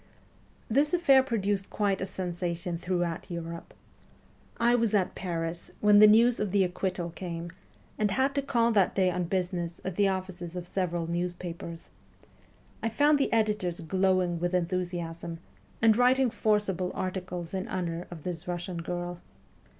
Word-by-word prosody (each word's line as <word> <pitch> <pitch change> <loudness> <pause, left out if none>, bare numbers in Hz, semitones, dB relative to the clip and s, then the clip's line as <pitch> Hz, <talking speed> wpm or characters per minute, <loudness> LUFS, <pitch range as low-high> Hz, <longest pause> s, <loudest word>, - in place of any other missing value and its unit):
This 285 +8 +3
affair 275 -7 +6
produced 205 -6 -1
quite 200 -2 0
a 190 - -1
sensation 175 -1 -3
throughout 175 -1 -2
Europe. 170 -1 -6 0.9
I 235 +1 +4
was 230 -3 +2
at 190 -2 +1
Paris 170 -2 -4
when 210 0 +6
the 215 - +10
news 230 +3 +5
of 210 - 0
the 200 0 +4
acquittal 180 -1 -2
came, 170 -1 -6 0.5
and 210 -1 +2
had 265 +7 +1
to 280 - +1
call 235 -4 +2
that 200 -4 +3
day 185 -2 +3
on 180 0 -1
business 175 -2 -2
at 190 -2 -4
the 200 -1 +4
offices 185 -2 -4
of 180 -1 -4
several 175 -2 -2
newspapers. 170 -1 -5 0.9
I 225 - 0
found 290 +5 +3
the 275 - +1
editors 210 -6 +1
glowing 185 0 +1
with 175 +1 0
enthusiasm, 170 -2 -2 0.5
and 220 -1 +6
writing 250 +1 +4
forcible 205 -5 +1
articles 180 -2 -4
in 190 0 -2
honour 175 -2 -3
of 165 -4 -9
this 175 -1 -5
Russian 175 0 -4
girl. 175 +1 -4
185 Hz, 150 wpm, -29 LUFS, 175-210 Hz, 0.9 s, the